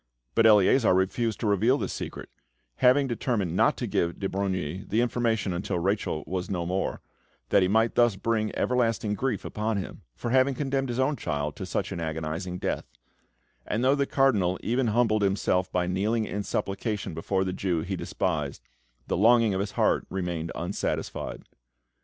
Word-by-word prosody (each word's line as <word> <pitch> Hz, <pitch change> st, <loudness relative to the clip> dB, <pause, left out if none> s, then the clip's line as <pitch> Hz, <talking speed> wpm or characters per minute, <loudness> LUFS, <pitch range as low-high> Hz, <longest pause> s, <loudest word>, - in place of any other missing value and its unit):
But 115 Hz, -, +5 dB
Eleazar 105 Hz, +1 st, +5 dB
refused 100 Hz, +4 st, 0 dB
to -, -, -1 dB
reveal 110 Hz, +6 st, +3 dB
the -, -, -2 dB
secret, -, -, -6 dB, 0.5 s
having 130 Hz, +3 st, +5 dB
determined 115 Hz, -8 st, -1 dB
not -, -, +3 dB
to -, -, -2 dB
give 85 Hz, 0 st, -1 dB
de 100 Hz, -, -1 dB
Brogni 95 Hz, -3 st, -2 dB
the 110 Hz, -, +1 dB
information 115 Hz, -5 st, 0 dB
until 90 Hz, +1 st, -2 dB
Rachel 90 Hz, -4 st, -1 dB
was 90 Hz, 0 st, -3 dB
no 90 Hz, -3 st, -2 dB
more, 95 Hz, +2 st, -2 dB, 0.5 s
that 100 Hz, -, +5 dB
he 95 Hz, -, +3 dB
might 110 Hz, +4 st, +2 dB
thus 120 Hz, -4 st, +4 dB
bring 110 Hz, +1 st, 0 dB
everlasting 115 Hz, -4 st, +1 dB
grief 120 Hz, 0 st, -2 dB
upon 110 Hz, 0 st, -2 dB
him 95 Hz, -, -6 dB
for 120 Hz, -, -4 dB
having 130 Hz, +1 st, +3 dB
condemned 135 Hz, -1 st, -1 dB
his 120 Hz, -, -2 dB
own 130 Hz, +2 st, +1 dB
child 75 Hz, -6 st, -3 dB
to -, -, -5 dB
such -, -, -2 dB
an -, -, -4 dB
agonising 80 Hz, +3 st, -3 dB
death; 95 Hz, +1 st, -3 dB, 0.8 s
and 110 Hz, +3 st, -1 dB
though 130 Hz, +1 st, +5 dB
the 140 Hz, -1 st, +1 dB
Cardinal 105 Hz, -10 st, +2 dB
even 120 Hz, +2 st, +1 dB
humbled 110 Hz, -1 st, +2 dB
himself 95 Hz, -2 st, +1 dB
by 90 Hz, -1 st, +1 dB
kneeling 105 Hz, +5 st, 0 dB
in 105 Hz, -, -3 dB
supplication 100 Hz, -1 st, -3 dB
before 95 Hz, +4 st, -1 dB
the 95 Hz, -1 st, -2 dB
Jew 90 Hz, -3 st, -1 dB
he -, -, -3 dB
despised, 75 Hz, -8 st, -2 dB, 0.4 s
the -, -, -1 dB
longing 115 Hz, +1 st, +5 dB
of 95 Hz, -, -1 dB
his 100 Hz, 0 st, -3 dB
heart -, -, +1 dB
remained 85 Hz, -3 st, -3 dB
unsatisfied. 90 Hz, +4 st, -3 dB
100 Hz, 175 wpm, -27 LUFS, 90-115 Hz, 0.8 s, But